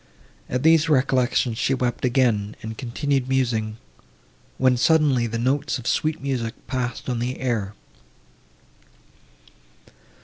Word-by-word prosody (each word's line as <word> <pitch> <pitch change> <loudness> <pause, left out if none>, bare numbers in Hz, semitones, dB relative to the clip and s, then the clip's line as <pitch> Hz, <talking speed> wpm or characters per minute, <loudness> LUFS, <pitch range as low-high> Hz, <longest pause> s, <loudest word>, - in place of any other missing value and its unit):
At 125 +1 -2
these 160 0 +5
recollections 130 -4 +2
she 135 - +1
wept 125 -2 -2
again, 120 -5 +1
and 110 0 -5
continued 130 +2 -2
musing, 115 -5 0 0.8
when 130 -1 +3
suddenly 135 -2 +3
the 115 +1 -3
notes 135 +5 0
of 125 - -10
sweet 155 +4 0
music 125 -4 -3
passed 125 -2 -3
on 125 -2 -1
the 125 +2 -3
air. 110 -6 -2
125 Hz, 115 wpm, -23 LUFS, 115-135 Hz, 0.8 s, these